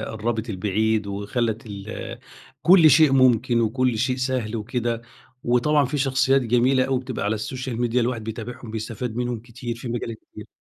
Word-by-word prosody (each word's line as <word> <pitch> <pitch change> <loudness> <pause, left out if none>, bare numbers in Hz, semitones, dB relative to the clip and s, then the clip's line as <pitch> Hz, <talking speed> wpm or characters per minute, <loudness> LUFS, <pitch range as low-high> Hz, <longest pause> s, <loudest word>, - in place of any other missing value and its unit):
قربت 110 +1 -3
البعيد 105 +2 0
وخلّت 110 +3 -2
ال 100 +1 -7 0.4
كل 170 -3 +7
شيء 150 0 +6
ممكن 125 -2 +4
وكل 120 +1 +1
شيء 125 +1 0
سهل 130 -4 -2
وكده، 115 +1 -2 0.4
وطبعًا 140 +5 +3
في 140 +3 -2
شخصيات 135 0 +2
جميلة 125 +2 +3
أوي 130 -1 0
بتبقى 125 -5 -5
على 105 - +1
السوشيال 125 +2 -4
ميديا 120 +1 +1
الواحد 120 -2 -1
بيتابعهم 115 +1 -7
بيستفاد 110 +1 -5
منهم 120 -2 -2
كتير 120 0 -7
في 120 - -7
مجالات 115 -1 -4 0.2
كتير. - - -10
120 Hz, 160 wpm, -23 LUFS, 110-130 Hz, 0.4 s, كل